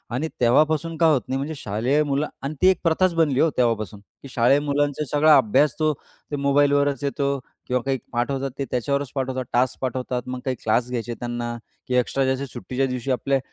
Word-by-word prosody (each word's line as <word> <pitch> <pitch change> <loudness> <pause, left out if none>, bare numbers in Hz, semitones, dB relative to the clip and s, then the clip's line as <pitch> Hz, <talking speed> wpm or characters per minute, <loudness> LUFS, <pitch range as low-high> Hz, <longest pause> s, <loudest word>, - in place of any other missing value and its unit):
आणि 150 +6 -1
तेव्हापासून 155 +7 +3
का 165 - +4
होत 140 -4 +2
नाही, 135 - -1
म्हणजे 150 +3 -4
शालेय 120 +7 0
मुलं 145 +1 0 0.2
आणि 140 +3 -3
ती 185 - +6
एक 190 - +2
प्रथाच 175 +2 +2
बनली 150 -5 +2
हो 165 - +4
तेव्हापासून, 110 -4 0 0.2
की - - -10
शाळेय 125 +3 +3
मुलांचा 145 0 0
सगळा 150 +1 +6
अभ्यास 130 +3 +3
तो 155 -1 +2 0.4
ते - - -1
मोबाईलवरच 145 -1 +2
येतो 140 0 -1 0.3
किंवा 125 -1 0
काही 135 -1 0
पाठवतात, 135 +3 -1
ते 140 - -2
त्याच्यावरच 140 +2 -1
पाठवतात, 130 -1 -2
टास्क 125 +1 +1
पाठवतात. 125 -1 -2
मग 130 0 -4
काही 130 -1 0
क्लास 120 +3 +1
घ्यायचे 120 -1 -3
त्यांना, 120 -1 -4 0.3
की 125 - -1
एक्स्ट्रा 135 +2 +1
जसे 135 +1 -4
सुट्टीच्या 125 +1 -3
दिवशी 125 +1 -3
आपले 135 +2 +1
135 Hz, 190 wpm, -23 LUFS, 125-145 Hz, 0.4 s, ती